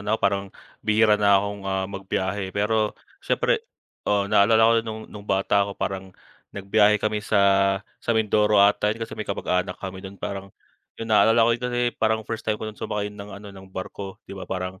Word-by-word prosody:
na 105 Hz, +2 st, 0 dB
ako -, -, -22 dB
parang 100 Hz, 0 st, +2 dB, 0.4 s
bihira 105 Hz, -1 st, +3 dB
na 100 Hz, -1 st, +5 dB
akong, 100 Hz, +1 st, -2 dB
ah, 95 Hz, 0 st, 0 dB
magbiyahe 95 Hz, 0 st, -3 dB
pero 105 Hz, +2 st, 0 dB, 0.2 s
siyempre 475 Hz, -3 st, +1 dB, 0.5 s
oo 100 Hz, -1 st, +2 dB
naalala 110 Hz, +2 st, +4 dB
ko 115 Hz, -, +5 dB
no'ng 110 Hz, -1 st, -8 dB
no'ng 105 Hz, -1 st, -10 dB
bata 100 Hz, +1 st, +2 dB
ako 100 Hz, -, -7 dB
parang 95 Hz, -1 st, -4 dB, 0.4 s
nagbiyahe 105 Hz, +2 st, +3 dB
kami 105 Hz, 0 st, -1 dB
sa 105 Hz, -1 st, +1 dB, 0.6 s
sa 115 Hz, -, 0 dB
Mindoro 105 Hz, -1 st, +3 dB
ata 100 Hz, +1 st, +4 dB
'yon 115 Hz, +2 st, -2 dB
kasi -, -, -12 dB
may 110 Hz, -, -6 dB
kapag-anak 90 Hz, -2 st, -1 dB
kami 95 Hz, -1 st, -7 dB
do'n. 95 Hz, +1 st, -10 dB
Parang 100 Hz, 0 st, -5 dB, 0.5 s
yung 115 Hz, -1 st, -4 dB
naalala 115 Hz, +2 st, +5 dB
ko 115 Hz, -, +3 dB
do'n, 125 Hz, 0 st, -2 dB
eh, 120 Hz, 0 st, +1 dB
parang 110 Hz, 0 st, 0 dB
first 110 Hz, +1 st, -4 dB
time 110 Hz, -1 st, -1 dB
ko 110 Hz, -, -7 dB
sumakay 105 Hz, -1 st, -4 dB
ng 100 Hz, -1 st, -9 dB
ano 100 Hz, 0 st, -11 dB
ng 95 Hz, 0 st, -13 dB
barko 95 Hz, +1 st, -7 dB
di -, -, -11 dB
ba, 95 Hz, -, -8 dB
parang 95 Hz, 0 st, -4 dB
105 Hz, 195 wpm, -24 LUFS, 100-110 Hz, 0.6 s, na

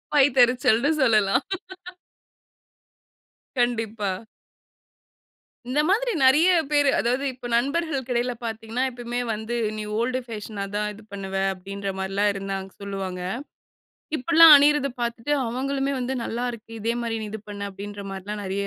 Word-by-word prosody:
வயித்தெரிச்சல்ன்னு 250 Hz, -1 st, +4 dB
சொல்லலாம். 215 Hz, -1 st, +3 dB, 2.1 s
கண்டிப்பா. 225 Hz, -4 st, 0 dB, 1.6 s
இந்த 260 Hz, +4 st, 0 dB
மாதிரி 475 Hz, +5 st, +2 dB
நெறைய 300 Hz, +8 st, +6 dB, 0.2 s
பேரு 290 Hz, -1 st, +4 dB
அதாவது 250 Hz, +4 st, 0 dB
இப்ப 245 Hz, -1 st, -8 dB
நண்பர்களுக்கு 275 Hz, 0 st, -1 dB
இடையில 245 Hz, +1 st, 0 dB
பார்த்தீங்கன்னா 225 Hz, +2 st, -3 dB
எப்பவுமே 240 Hz, -1 st, -5 dB
வந்து 220 Hz, +3 st, -4 dB, 0.2 s
நீ 215 Hz, -, -3 dB, 0.2 s
ஓல்டு 255 Hz, +2 st, 0 dB
ஃபேஷனா 215 Hz, -3 st, -6 dB
தான் 210 Hz, 0 st, 0 dB
இது 210 Hz, -, -13 dB
பண்ணுவ 195 Hz, -1 st, -6 dB, 0.2 s
அப்டின்ற 195 Hz, +2 st, -6 dB
மாரிலா 195 Hz, +2 st, -1 dB
இருந்தாங்க 195 Hz, -1 st, -4 dB
சொல்லுவாங்க. 195 Hz, -2 st, -4 dB, 1.0 s
இப்பலா 330 Hz, +4 st, +6 dB
அணியறத 290 Hz, 0 st, +4 dB
பார்த்துட்டு 235 Hz, +3 st, -2 dB
அவங்களுமே 270 Hz, +3 st, -1 dB
வந்து 255 Hz, +1 st, -2 dB
நல்லா 235 Hz, +2 st, -3 dB
இருக்கு. 230 Hz, -1 st, -11 dB
இதே 225 Hz, +2 st, 0 dB
மாரி 230 Hz, -1 st, -2 dB
நீ -, -, -4 dB
இது 220 Hz, 0 st, -6 dB
பண்ணு 200 Hz, 0 st, -5 dB
அப்டின்ற 200 Hz, +1 st, -8 dB
மாரிலாம். 200 Hz, +2 st, -5 dB
நெறைய 195 Hz, +1 st, -2 dB
235 Hz, 125 wpm, -24 LUFS, 200-260 Hz, 2.1 s, நெறைய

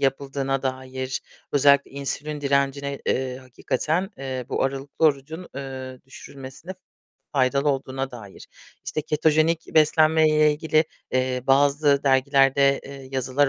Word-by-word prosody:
yapıldığına 135 Hz, 0 st, -1 dB
dair, 130 Hz, 0 st, -4 dB, 0.3 s
özellikle 140 Hz, 0 st, +4 dB
insülin 145 Hz, +2 st, -2 dB
direncine, 140 Hz, 0 st, 0 dB
eee, 130 Hz, -1 st, -1 dB
hakikaten, 155 Hz, +8 st, -2 dB
eee, 130 Hz, -2 st, -4 dB
bu -, -, -1 dB
aralıklı 135 Hz, +3 st, -2 dB
orucun, 155 Hz, +4 st, 0 dB
eee, 130 Hz, -2 st, -7 dB
düşürülmesine 135 Hz, +5 st, -10 dB, 0.6 s
faydalı 140 Hz, +1 st, +2 dB
olduğuna 135 Hz, 0 st, -3 dB
dair. 110 Hz, -6 st, -11 dB, 0.4 s
İşte 155 Hz, -, -3 dB
ketojenik 155 Hz, +2 st, +1 dB
beslenmeyle 155 Hz, 0 st, +4 dB
ilgili, 155 Hz, +1 st, +1 dB, 0.3 s
eee, 130 Hz, -1 st, 0 dB
bazı 140 Hz, +1 st, +3 dB
dergilerde, 135 Hz, 0 st, +3 dB
eee, 135 Hz, -1 st, -10 dB
yazılar 135 Hz, +2 st, +1 dB
140 Hz, 110 wpm, -24 LUFS, 130-150 Hz, 0.6 s, özellikle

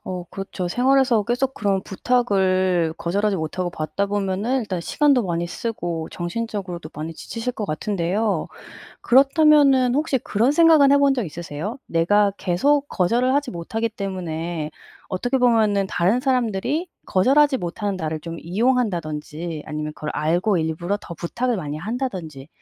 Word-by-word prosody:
어 180 Hz, -1 st, -5 dB
그렇죠. 195 Hz, -2 st, -5 dB
생활에서 255 Hz, 0 st, +3 dB
계속 255 Hz, +3 st, -1 dB
그런 195 Hz, -2 st, 0 dB
부탁을 185 Hz, -7 st, +1 dB
거절하지 200 Hz, +3 st, 0 dB
못하고 175 Hz, +3 st, -3 dB
받다 170 Hz, +6 st, -2 dB
보면은 205 Hz, +5 st, -1 dB
일단 190 Hz, -6 st, -3 dB
시간도 280 Hz, -, +2 dB
많이 170 Hz, -1 st, -1 dB
쓰고 175 Hz, -6 st, -4 dB
정신적으로도 180 Hz, -3 st, -5 dB
많이 155 Hz, +2 st, -5 dB
지치실 235 Hz, +7 st, -5 dB
것 215 Hz, -, -4 dB
같은데요. 190 Hz, +3 st, -1 dB, 0.5 s
그렇다면은 275 Hz, -1 st, +5 dB
혹시 295 Hz, -3 st, +1 dB
그런 230 Hz, +5 st, +1 dB
생각은 310 Hz, -3 st, +6 dB
해본 280 Hz, -1 st, +5 dB
적 245 Hz, -5 st, -1 dB
있으세요? 170 Hz, -, -6 dB
'내가 200 Hz, +5 st, +3 dB
계속 280 Hz, +11 st, +1 dB
거절을 240 Hz, +8 st, +1 dB
하지 285 Hz, -2 st, 0 dB
못하기 220 Hz, +7 st, -3 dB
때문에 175 Hz, -6 st, -4 dB, 0.4 s
어떻게 245 Hz, +8 st, 0 dB
보면은 215 Hz, -5 st, +3 dB
다른 190 Hz, +8 st, +1 dB
사람들이 255 Hz, -, 0 dB, 0.2 s
거절하지 270 Hz, +8 st, +3 dB
못하는 195 Hz, +2 st, -3 dB
나를 160 Hz, -2 st, -3 dB
좀 165 Hz, +1 st, -7 dB
이용한다.'든지 170 Hz, -, -1 dB
아니면 150 Hz, 0 st, -4 dB
'그걸 150 Hz, -, -5 dB
알고 175 Hz, +6 st, +1 dB
일부러 165 Hz, +5 st, -1 dB
더 170 Hz, -, -8 dB
부탁을 235 Hz, +9 st, -2 dB
많이 150 Hz, -3 st, -4 dB
한다.'든지 180 Hz, -, -5 dB
200 Hz, 355 characters per minute, -22 LUFS, 170-250 Hz, 0.5 s, 생각은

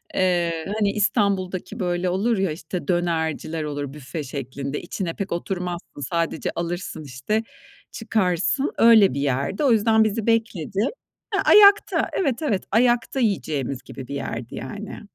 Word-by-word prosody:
Eee, 170 Hz, -3 st, +1 dB
hani 205 Hz, -2 st, +2 dB
İstanbul'daki 200 Hz, -3 st, 0 dB
böyle 180 Hz, 0 st, 0 dB
olur 205 Hz, +6 st, +1 dB
ya, 190 Hz, -3 st, +1 dB
işte, 160 Hz, +3 st, -6 dB
dönerciler 165 Hz, -2 st, -1 dB
olur 145 Hz, -2 st, -4 dB
büfe 150 Hz, +2 st, -6 dB
şeklinde, 140 Hz, +1 st, -5 dB
içine 170 Hz, -4 st, -4 dB
pek 195 Hz, -1 st, -5 dB
oturmazsın. 175 Hz, -3 st, -4 dB
Sadece 165 Hz, -1 st, -1 dB
alırsın, 170 Hz, -2 st, -4 dB
işte, 140 Hz, -, -2 dB, 0.5 s
çıkarsın, 215 Hz, -, 0 dB
öyle 225 Hz, -, +7 dB
bir 140 Hz, -, -2 dB
yerdi. 140 Hz, -, -1 dB
O 270 Hz, -, +4 dB
yüzden 220 Hz, 0 st, +4 dB
bizi 215 Hz, +1 st, -1 dB
bekledi 220 Hz, -5 st, 0 dB, 0.5 s
He -, -, +2 dB
ayakta, 410 Hz, 0 st, +6 dB
evet, 275 Hz, -7 st, 0 dB
evet 215 Hz, -11 st, 0 dB
ayakta 240 Hz, +3 st, +2 dB
yiyeceğimiz 150 Hz, -, -1 dB
gibi 130 Hz, -, -9 dB
bir 140 Hz, -, -5 dB
yerdi 120 Hz, -3 st, -5 dB
yani. 200 Hz, -, -7 dB
180 Hz, 140 wpm, -23 LUFS, 155-215 Hz, 0.5 s, öyle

